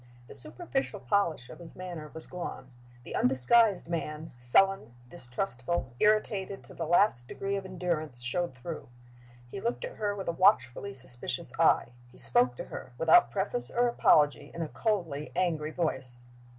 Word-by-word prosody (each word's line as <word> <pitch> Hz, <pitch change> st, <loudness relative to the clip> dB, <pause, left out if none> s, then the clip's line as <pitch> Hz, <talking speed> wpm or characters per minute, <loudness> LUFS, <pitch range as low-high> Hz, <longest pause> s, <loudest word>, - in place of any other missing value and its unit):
The -, -, -11 dB
superficial 210 Hz, -, -3 dB
polish 170 Hz, -12 st, 0 dB
of -, -, -11 dB
his 170 Hz, -2 st, -11 dB
manner 175 Hz, -4 st, -7 dB
was 160 Hz, -, -9 dB
gone; 155 Hz, -7 st, -7 dB, 0.3 s
the -, -, -7 dB
undisguised 175 Hz, -, +4 dB
man, 160 Hz, -2 st, -4 dB
sullen, 120 Hz, -, +3 dB
distrustful, 130 Hz, -1 st, -3 dB
irritated 210 Hz, -2 st, +1 dB
to -, -, -14 dB
the 165 Hz, -, -4 dB
last 170 Hz, -, +3 dB
degree 195 Hz, +7 st, -3 dB
of 195 Hz, -1 st, -4 dB
endurance, 170 Hz, -7 st, -3 dB
showed 130 Hz, +5 st, -2 dB
through. 155 Hz, +6 st, -7 dB, 0.6 s
He 195 Hz, +11 st, -7 dB
looked 235 Hz, -, -2 dB
at -, -, -9 dB
her 205 Hz, -1 st, -1 dB
with 195 Hz, -2 st, -6 dB
a -, -, +2 dB
watchfully 185 Hz, -, +2 dB
suspicious 125 Hz, -2 st, -6 dB
eye; -, -, +4 dB, 0.2 s
he -, -, -18 dB
spoke 120 Hz, +1 st, +3 dB
to -, -, -5 dB
her, 125 Hz, -, -9 dB
without 160 Hz, -6 st, +6 dB
preface 120 Hz, +1 st, 0 dB
or 245 Hz, 0 st, +2 dB
apology, 150 Hz, -10 st, +3 dB
in 170 Hz, -, -2 dB
a -, -, -3 dB
coldly 170 Hz, -10 st, -2 dB
angry 160 Hz, -4 st, 0 dB
voice. 130 Hz, -7 st, -3 dB
165 Hz, 160 wpm, -30 LUFS, 125-195 Hz, 0.6 s, without